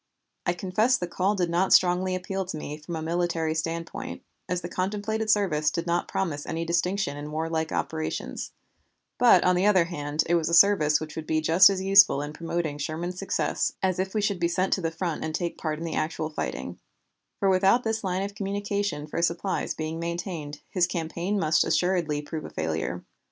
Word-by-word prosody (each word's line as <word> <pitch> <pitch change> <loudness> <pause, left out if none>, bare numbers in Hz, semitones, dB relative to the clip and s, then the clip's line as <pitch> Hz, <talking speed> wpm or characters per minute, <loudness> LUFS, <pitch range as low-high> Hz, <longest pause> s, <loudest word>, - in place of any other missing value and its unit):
I 175 - +3
confess 210 +8 +1
the 175 - -3
call 190 +4 0
did 175 -3 0
not 180 +3 +2
strongly 185 +1 +4
appeal 190 +1 -3
to 175 -3 -5
me 150 -1 -5
from 165 +3 -6
a 160 - -4
military 165 -1 0
viewpoint, 165 +1 -4 0.3
as 180 0 -1
the 175 - -5
contemplated 210 +4 -2
service 180 -8 +2
did 170 +2 -3
not 170 0 0
promise 155 -6 -2
any 165 +1 -2
distinction 175 -1 0
in 145 +1 -6
warlike 160 +1 -2
operations; 160 0 -3 0.7
but 245 -1 +6
on 180 0 +4
the 185 +3 +2
other 185 -5 +5
hand, 150 -3 -2
it 170 - 0
was 165 -2 +2
a 170 - +3
service 160 -6 +5
which 155 -1 -7
would 160 -1 -6
be 155 - +1
just 165 +5 +6
as 190 -1 -2
useful 195 -6 +6
in 145 +1 -6
promoting 165 -2 -3
Sherman's 170 +5 -4
success 195 - -1
as 185 -1 +1
if 190 +2 -2
we 215 - +2
should 200 -3 0
be 170 - +2
sent 185 +2 0
to 190 - 0
the 165 - 0
front 165 -1 -3
and 160 0 -3
take 170 -1 -2
part 155 -2 -2
in 165 - -5
the 165 - -4
actual 155 0 -2
fighting, 65 - -4 0.6
for 200 - +1
without 195 +6 +4
this 220 -1 -1
line 185 0 -1
of 200 0 -5
communication 200 -4 -2
for 155 +2 -3
supplies 170 +3 -1
being 160 +1 -4
maintained 170 -3 -5
his 180 -2 +2
campaign 175 +4 -2
must 155 -3 +3
assuredly 170 -5 0
prove 155 +1 -5
a - - -7
failure. - - -3
175 Hz, 200 wpm, -26 LUFS, 160-190 Hz, 0.7 s, but